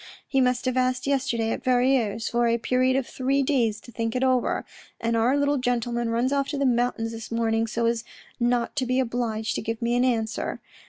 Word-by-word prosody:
He 270 Hz, -2 st, +2 dB
must 250 Hz, -1 st, +1 dB
have 255 Hz, 0 st, 0 dB
asked 255 Hz, 0 st, +1 dB
yesterday 260 Hz, -5 st, 0 dB
at -, -, -4 dB
Verrieres 245 Hz, -4 st, +2 dB
for 240 Hz, 0 st, +1 dB
a 230 Hz, 0 st, +2 dB
period 255 Hz, +2 st, +1 dB
of 270 Hz, -1 st, +1 dB
three 270 Hz, +3 st, 0 dB
days 235 Hz, -6 st, +1 dB
to 240 Hz, -, -13 dB
think 230 Hz, 0 st, -3 dB
it 255 Hz, -, +1 dB
over, 255 Hz, -2 st, +1 dB, 0.3 s
and 230 Hz, 0 st, 0 dB
our 240 Hz, +5 st, +3 dB
little 285 Hz, 0 st, +2 dB
gentleman 240 Hz, -1 st, -1 dB
runs 240 Hz, +4 st, +1 dB
off 275 Hz, -1 st, +1 dB
to 290 Hz, -, -3 dB
the 280 Hz, -, +1 dB
mountains 240 Hz, -2 st, +1 dB
this 225 Hz, -1 st, -7 dB
morning 225 Hz, -1 st, 0 dB
so 230 Hz, +1 st, -1 dB
as 230 Hz, 0 st, 0 dB, 0.4 s
not 240 Hz, 0 st, +1 dB
to 260 Hz, -3 st, 0 dB
be 255 Hz, +1 st, +1 dB
obliged 230 Hz, -3 st, -1 dB
to -, -, -2 dB
give 225 Hz, +1 st, -3 dB
me 235 Hz, 0 st, 0 dB
an 245 Hz, -, +3 dB
answer. 225 Hz, -3 st, -1 dB
245 Hz, 215 wpm, -25 LUFS, 230-255 Hz, 0.4 s, our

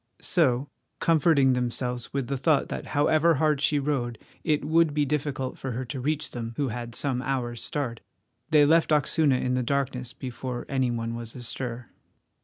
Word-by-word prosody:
So, 140 Hz, -6 st, +2 dB, 0.3 s
comforting 155 Hz, -5 st, +4 dB
themselves 125 Hz, 0 st, -2 dB
with 135 Hz, -2 st, -1 dB
the 140 Hz, -, -2 dB
thought 140 Hz, +1 st, +2 dB
that -, -, -5 dB
however 155 Hz, +3 st, +4 dB
hard 150 Hz, 0 st, +2 dB
she 150 Hz, 0 st, +3 dB
rode 135 Hz, -5 st, -1 dB, 0.3 s
it 150 Hz, -2 st, +1 dB
would 160 Hz, -1 st, +3 dB
be 150 Hz, -1 st, +2 dB
difficult 140 Hz, -2 st, -2 dB
for 135 Hz, -2 st, -4 dB
her 130 Hz, +3 st, -3 dB
to 130 Hz, +2 st, -5 dB
reach 150 Hz, +3 st, -1 dB
them, 115 Hz, -1 st, -5 dB
who 140 Hz, -3 st, 0 dB
had 120 Hz, 0 st, -5 dB
some 130 Hz, -3 st, 0 dB
hours' 125 Hz, -3 st, -2 dB
start, 125 Hz, -6 st, -3 dB, 0.5 s
they 150 Hz, -2 st, +6 dB
left 165 Hz, +2 st, +4 dB
Oxuna 150 Hz, -2 st, +3 dB
in 125 Hz, -, 0 dB
the 125 Hz, -, +1 dB
darkness 130 Hz, -1 st, -1 dB
before 125 Hz, -1 st, -5 dB
any 130 Hz, -2 st, +1 dB
one 115 Hz, -1 st, -2 dB
was 115 Hz, -1 st, -7 dB
astir. 120 Hz, -1 st, -4 dB
135 Hz, 175 wpm, -26 LUFS, 125-150 Hz, 0.5 s, they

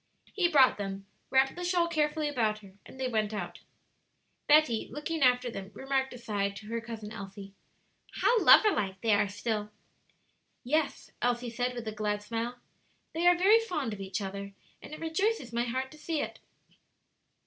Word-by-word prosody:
He 370 Hz, -4 st, +2 dB
brought 275 Hz, -9 st, +5 dB
them, 195 Hz, -1 st, -5 dB, 0.2 s
wrapped 265 Hz, 0 st, +3 dB
the 355 Hz, -, -5 dB
shawl 350 Hz, -1 st, +2 dB
carefully 305 Hz, -2 st, 0 dB
about 225 Hz, -7 st, 0 dB
her, 190 Hz, -1 st, -14 dB
and 265 Hz, -, -13 dB
they 260 Hz, -, 0 dB
went 215 Hz, -3 st, -1 dB
out. -, -, -5 dB, 0.9 s
Betty, 295 Hz, -7 st, +4 dB
looking 310 Hz, +2 st, -4 dB
after 250 Hz, -1 st, +3 dB
them, 195 Hz, -3 st, -7 dB
remarked 270 Hz, 0 st, -1 dB
aside 205 Hz, -5 st, -2 dB
to 210 Hz, -, -10 dB
her 230 Hz, 0 st, -2 dB
Cousin 225 Hz, -2 st, -7 dB
Elsie, 195 Hz, -1 st, -9 dB, 0.6 s
"How 475 Hz, -3 st, +3 dB
lover 425 Hz, -, +8 dB
like 195 Hz, -, -2 dB
they 225 Hz, -2 st, +3 dB
are 205 Hz, 0 st, +3 dB
still!" 210 Hz, +1 st, -3 dB, 0.9 s
"Yes," 300 Hz, +4 st, -1 dB
Elsie 240 Hz, 0 st, 0 dB
said, 245 Hz, +1 st, -2 dB
with 235 Hz, -2 st, -6 dB
a -, -, -1 dB
glad 210 Hz, -1 st, -2 dB
smile: 230 Hz, +3 st, -3 dB, 0.6 s
"they 335 Hz, +2 st, +1 dB
are 355 Hz, 0 st, +6 dB
very 405 Hz, +5 st, +6 dB
fond 305 Hz, -, -3 dB
of 200 Hz, -, -7 dB
each 195 Hz, +1 st, -3 dB
other, 200 Hz, 0 st, -6 dB, 0.3 s
and -, -, -11 dB
it 305 Hz, -, -7 dB
rejoices 325 Hz, -, -1 dB
my 235 Hz, +1 st, 0 dB
heart 260 Hz, +2 st, -3 dB
to 310 Hz, -, -14 dB
see 320 Hz, 0 st, -2 dB
it." -, -, -4 dB
245 Hz, 175 wpm, -30 LUFS, 210-300 Hz, 0.9 s, lover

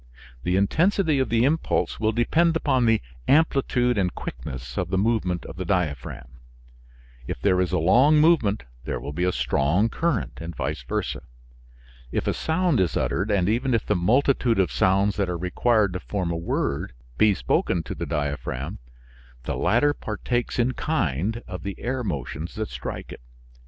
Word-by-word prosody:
The 90 Hz, +6 st, 0 dB
intensity 160 Hz, -, +2 dB
of 130 Hz, -, 0 dB
the 115 Hz, +1 st, +3 dB
impulse 160 Hz, +4 st, 0 dB
will 110 Hz, 0 st, +2 dB
depend 160 Hz, +9 st, +2 dB
upon 130 Hz, -7 st, +2 dB
the 115 Hz, -1 st, +3 dB, 0.2 s
amplitude 135 Hz, -6 st, +3 dB
and 90 Hz, -2 st, 0 dB
quickness 60 Hz, 0 st, -7 dB
of 90 Hz, -1 st, -2 dB
the 95 Hz, -, 0 dB
movement 100 Hz, -4 st, 0 dB
of -, -, -9 dB
the 95 Hz, -, -3 dB
diaphragm. 75 Hz, -8 st, -3 dB, 0.9 s
If -, -, -4 dB
there 95 Hz, -2 st, +2 dB
is 90 Hz, -, 0 dB
a 90 Hz, -, +1 dB
long 125 Hz, -, +5 dB
movement 150 Hz, -, +3 dB, 0.2 s
there -, -, -3 dB
will 70 Hz, -, -6 dB
be 90 Hz, +4 st, 0 dB
a 90 Hz, -, +2 dB
strong 90 Hz, +9 st, +1 dB
current 170 Hz, +8 st, -1 dB
and 85 Hz, 0 st, -6 dB
vice -, -, -3 dB
versa. -, -, -3 dB, 0.9 s
If -, -, -1 dB
a -, -, +1 dB
sound 165 Hz, -, +1 dB
is 90 Hz, -3 st, +1 dB
uttered, 100 Hz, +5 st, 0 dB
and 95 Hz, -4 st, +2 dB
even 120 Hz, +4 st, +1 dB
if 115 Hz, -, -1 dB
the 105 Hz, -, +1 dB
multitude 120 Hz, +5 st, +2 dB
of 95 Hz, -2 st, +2 dB
sounds 100 Hz, +2 st, +2 dB
that 100 Hz, -3 st, 0 dB
are 90 Hz, -, -2 dB
required 100 Hz, +3 st, +1 dB
to 90 Hz, -, -3 dB
form 90 Hz, -4 st, -3 dB
a -, -, -1 dB
word, 85 Hz, -6 st, -2 dB, 0.3 s
be 105 Hz, -2 st, +5 dB
spoken 85 Hz, -2 st, 0 dB
to -, -, -5 dB
the -, -, -5 dB
diaphragm, 70 Hz, -1 st, -3 dB, 0.6 s
the -, -, -3 dB
latter 120 Hz, +11 st, +3 dB
partakes 120 Hz, 0 st, -3 dB
in 120 Hz, +1 st, +2 dB
kind 110 Hz, -, -1 dB
of 90 Hz, 0 st, -6 dB
the 100 Hz, 0 st, -5 dB
air 130 Hz, +1 st, -2 dB
motions 80 Hz, -, -4 dB
that 110 Hz, 0 st, -3 dB
strike -, -, -6 dB
it. -, -, -10 dB
100 Hz, 175 wpm, -24 LUFS, 90-125 Hz, 0.9 s, long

